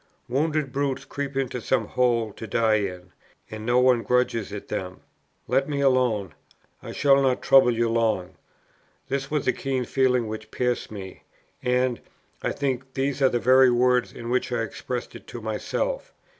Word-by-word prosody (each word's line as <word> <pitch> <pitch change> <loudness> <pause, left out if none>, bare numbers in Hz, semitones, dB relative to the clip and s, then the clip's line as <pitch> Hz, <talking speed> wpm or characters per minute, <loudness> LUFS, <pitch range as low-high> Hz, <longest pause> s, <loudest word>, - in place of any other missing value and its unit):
Wounded 150 +2 0
brutes 140 -1 -1
creep 140 -1 -5
into 125 -2 -2
some 130 - +1
hole 115 -4 +1
to 110 - -8
die 110 -1 +2
in, 90 -3 -5 0.4
and 110 0 -6
no 120 +1 +3
one 125 -2 +4
grudges 125 -4 0
it 105 -1 -7
them. 90 0 -5 0.5
Let 135 +4 +1
me 145 -1 -1
alone, 125 - +2 0.5
I - - -8
shall 140 -1 +4
not 130 -2 +1
trouble 135 -2 +6
you 120 0 +1
long. 110 -6 0 0.8
This 135 0 -2
was 150 -2 -1
the 130 - +3
keen 130 -2 -2
feeling 125 -2 +2
which 110 0 -6
pierced 125 +1 -1
me, 95 -3 -9 0.4
and, 125 -1 +1 0.4
I - - -1
think, 130 -1 -3
these 140 +1 -1
are 135 - +5
the 120 - 0
very 130 +2 +5
words 125 0 +2
in 120 0 -7
which 125 0 0
I 120 -2 0
expressed 120 +2 -5
it - - -12
to 120 - -7
myself. - - -3
125 Hz, 170 wpm, -25 LUFS, 115-135 Hz, 0.8 s, trouble